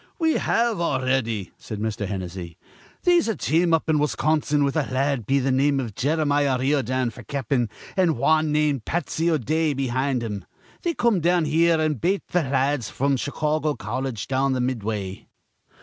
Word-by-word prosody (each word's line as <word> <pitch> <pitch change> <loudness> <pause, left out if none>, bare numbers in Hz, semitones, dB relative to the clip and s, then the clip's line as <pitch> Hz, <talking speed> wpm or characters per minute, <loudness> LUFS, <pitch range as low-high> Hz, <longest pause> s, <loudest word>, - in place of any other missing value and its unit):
"We 320 -2 +2
have 230 -5 +1
already," 130 - 0
said 110 - -7
Mr. 105 -1 -2
Hennessy. 90 -3 -6 0.5
"They'se 350 -4 +4
a 225 - 0
team 170 +2 +1
up 165 0 +2
in 155 -2 +2
Wisconsin 150 0 +1
with 140 -1 0
a 155 -3 +1
la 130 - -2
ad 135 -5 0
be 140 +1 +3
th' 135 0 +1
name 140 +1 +2
iv 120 -5 -4
Jeremiah 145 0 +1
Riordan 130 -2 0
f'r 120 -3 -13
cap'n, 130 -4 -1 0.3
an' 180 - +2
wan 155 +4 +2
named 150 -5 +1
Patsy 165 +2 -1
O'Dea 155 0 +1
behind 130 -1 -1
him. 105 -4 -4 0.4
They 340 -2 -1
come 235 -5 +2
down 175 0 +2
here, 165 +2 +3
an' 155 -4 0
bate 190 - 0
th' - - -24
la 135 0 +1
ads 125 -7 -3
fr'm 140 +1 0
th' - - -3
Chicawgo 150 +1 -1
Colledge 120 0 -4
down 135 0 +1
be 130 - -1
th' - - +1
Midway." 105 -6 -3
140 Hz, 180 wpm, -24 LUFS, 125-155 Hz, 0.5 s, They'se